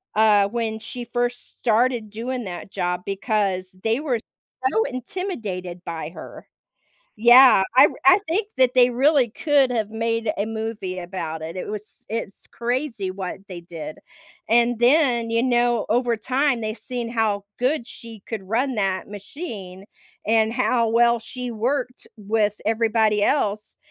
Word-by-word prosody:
uh, 210 -2 +5
when 225 -1 -2
she 240 +2 -7
first 245 +1 -3
started 235 -1 +1
doing 240 +2 -4
that 180 +1 -7
job 180 -1 -2
because 195 -2 -1
they 225 +3 +1
were 265 -6 -1 0.5
so 445 - +2
intimidated 225 - -5
by 160 -2 -5
her. - - -11 0.7
Yeah. 240 -1 +8
I - - +9
r - - -4
I 365 +2 +8
think 405 +5 0
that 255 -1 +3
they 250 -1 +6
really 265 0 +3
could 280 -1 +2
have 220 -3 -1
made 230 -1 -1
a 205 - -1
movie 220 -4 -4
about 170 -3 -5
it. 165 +3 -6
It 185 - -5
was 210 0 -8
it's 215 -3 -5
crazy 240 -4 -2
what 185 -1 -5
they 180 -3 -7
did. 160 -3 -8 0.5
And 235 +1 +3
then, 245 -3 +3
you 230 +1 +2
know, 240 -2 +2
over 240 +1 +1
time, 255 +3 0
they've 215 0 -3
seen 245 -2 -5
how 215 -4 0
good 255 0 0
she 225 -4 -11
could 220 -4 -5
run 250 +4 0
that 195 -2 -1
machine 205 - -8 0.4
and 220 0 +3
how 240 -2 +1
well 235 +1 +4
she 250 +2 -6
worked 250 +3 -2
with 210 0 0
everybody 220 -1 +2
else 210 -5 0
225 Hz, 150 wpm, -23 LUFS, 205-245 Hz, 0.7 s, I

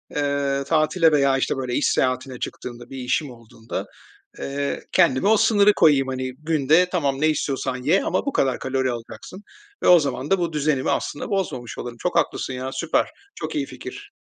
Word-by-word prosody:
eee, 140 -1 0
tatile 160 +1 +3
veya, 140 -2 +3
işte, 135 - 0
böyle 130 -2 -3
iş - - +1
seyahatine 130 0 -1
çıktığımda, 120 -1 -7
bir 135 - -8
işim 130 +3 -1
olduğunda, 115 -1 -7 0.5
eee, 140 +1 -3
kendime 130 +8 +3
o 220 +1 +5
sınırı 210 -1 +5
koyayım. 140 -7 +4
Hani, 130 0 -3
“Günde, 160 +3 +3
tamam, 140 -6 0
ne 155 - +4
istiyorsan 135 -4 -1
ye 165 +8 +3
ama 185 - -1
bu 280 - -2
kadar 130 -2 +1
kalori 130 -1 -1
alacaksın.” 120 - -8 0.4
ve - - +2
o 175 -1 +8
zaman 140 -1 -3
da 195 - +4
bu 170 -2 -2
düzenimi 150 -3 0
aslında 145 - -3
bozmamış 150 - -3
olurum. 120 -1 -6
Çok 180 - -2
haklısın 130 - 0
ya, 130 +1 -4
süper. 155 +5 0 0.3
Çok - - -5
iyi 295 -2 0
fikir. 295 - -10
140 Hz, 180 wpm, -23 LUFS, 130-165 Hz, 0.5 s, o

